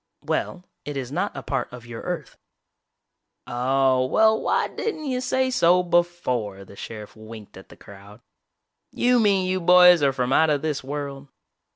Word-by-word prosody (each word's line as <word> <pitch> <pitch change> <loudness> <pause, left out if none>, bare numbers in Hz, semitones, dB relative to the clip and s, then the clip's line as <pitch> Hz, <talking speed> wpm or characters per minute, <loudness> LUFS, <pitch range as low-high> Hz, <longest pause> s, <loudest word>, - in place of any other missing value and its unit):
"Well, 180 - -3 0.2
it 145 -1 -6
is 130 -1 -5
not - - -3
a - - -6
part - - -3
of 125 -1 -11
your 115 -1 -8
Earth." - - -5 1.1
"Oh, 130 +1 +1
well 220 +8 +3
why - - 0
didn't 365 -9 -5
you 255 -2 -2
say 260 +1 0
so 180 -7 +3
before!" 165 - -1
The 100 - -15
sheriff 105 0 -9
winked 110 -1 -12
at 95 - -14
the - - -15
crowd. 100 +2 -15 0.7
"You 245 0 +2
mean 200 -4 +2
you 185 0 -1
boys 180 -1 +7
are 140 -1 +3
from 130 -1 -1
out 160 +2 +4
of 145 -1 0
this 150 -4 -2
world?" 140 0 -6
145 Hz, 170 wpm, -23 LUFS, 120-180 Hz, 1.1 s, boys